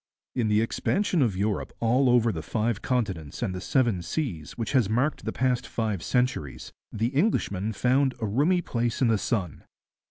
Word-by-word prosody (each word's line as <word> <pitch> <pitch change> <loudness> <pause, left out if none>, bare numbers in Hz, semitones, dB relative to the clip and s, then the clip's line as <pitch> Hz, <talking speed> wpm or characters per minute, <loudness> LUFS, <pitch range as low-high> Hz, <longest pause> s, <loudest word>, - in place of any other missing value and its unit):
In 120 -3 0
the 105 0 +3
expansion 180 - 0
of 110 -8 +1
Europe 105 0 -1
over 120 0 +3
all - - -6
the 80 - -4
five 110 +4 -1
continents 95 - -2
and 100 -6 -1
the 90 - -5
seven 115 -6 +1
seas 85 - -4
which 115 - -3
has 125 -8 +3
marked 125 +7 0
the - - -1
past 125 -1 0
five 110 -6 -2
centuries, 125 - -1 0.2
the 115 +2 0
Englishman 125 - 0
found 130 +4 +2
a 110 - -2
roomy 150 - +2
place 120 0 -1
in 120 - +4
the 110 -2 +2
sun. 95 - -2
115 Hz, 180 wpm, -26 LUFS, 105-130 Hz, 0.2 s, in